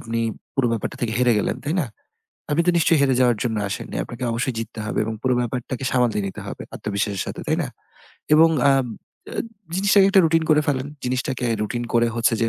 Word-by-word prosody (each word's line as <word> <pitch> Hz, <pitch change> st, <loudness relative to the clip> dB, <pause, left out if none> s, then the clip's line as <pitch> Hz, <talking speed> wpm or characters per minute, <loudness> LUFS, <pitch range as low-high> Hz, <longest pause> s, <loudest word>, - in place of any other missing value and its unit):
আপনি 115 Hz, -4 st, -3 dB, 0.4 s
পুরো 135 Hz, -3 st, +2 dB
ব্যাপারটা 115 Hz, -, -3 dB
থেকে 115 Hz, -2 st, -1 dB
হেরে 125 Hz, -1 st, +4 dB
গেলেন, 105 Hz, -, -1 dB
তাই 150 Hz, +4 st, -1 dB
না? 145 Hz, -, -1 dB, 0.6 s
আপনি 160 Hz, +3 st, +3 dB
তো 175 Hz, -, +6 dB
নিশ্চয়ই 165 Hz, -1 st, +4 dB
হেরে 135 Hz, -2 st, +3 dB
যাওয়ার 120 Hz, -3 st, +4 dB
জন্য 115 Hz, -3 st, -1 dB
আসেননি। 100 Hz, -, -5 dB
আপনাকে 120 Hz, +1 st, -9 dB
অবশ্যই 125 Hz, +2 st, -1 dB
জিততে 115 Hz, 0 st, -6 dB
হবে -, -, -3 dB
এবং 110 Hz, +1 st, -3 dB
পুরো 130 Hz, -1 st, +2 dB
ব্যাপারটাকে 125 Hz, +2 st, -3 dB
সামলে 125 Hz, -4 st, +2 dB
নিতে 95 Hz, -, -6 dB
হবে -, -, -6 dB
আত্মবিশ্বাসের 100 Hz, -1 st, -2 dB
সাথে, -, -, -5 dB
তাই -, -, +1 dB
না? -, -, -4 dB, 0.7 s
এবং 165 Hz, +1 st, +7 dB, 0.2 s
আ -, -, +6 dB, 0.6 s
জ -, -, -7 dB, 0.4 s
জিনিসটাকে 195 Hz, 0 st, +5 dB
একটা 195 Hz, -, +6 dB
routine 165 Hz, 0 st, +2 dB
করে 150 Hz, 0 st, +6 dB
ফেলেন। 135 Hz, -1 st, 0 dB, 0.2 s
জিনিসটাকে 125 Hz, 0 st, -1 dB, 0.2 s
routine 120 Hz, +2 st, -3 dB
করে 120 Hz, 0 st, +4 dB
হচ্ছে 115 Hz, 0 st, +3 dB
যে 115 Hz, -, +3 dB
125 Hz, 200 wpm, -22 LUFS, 115-145 Hz, 0.7 s, এবং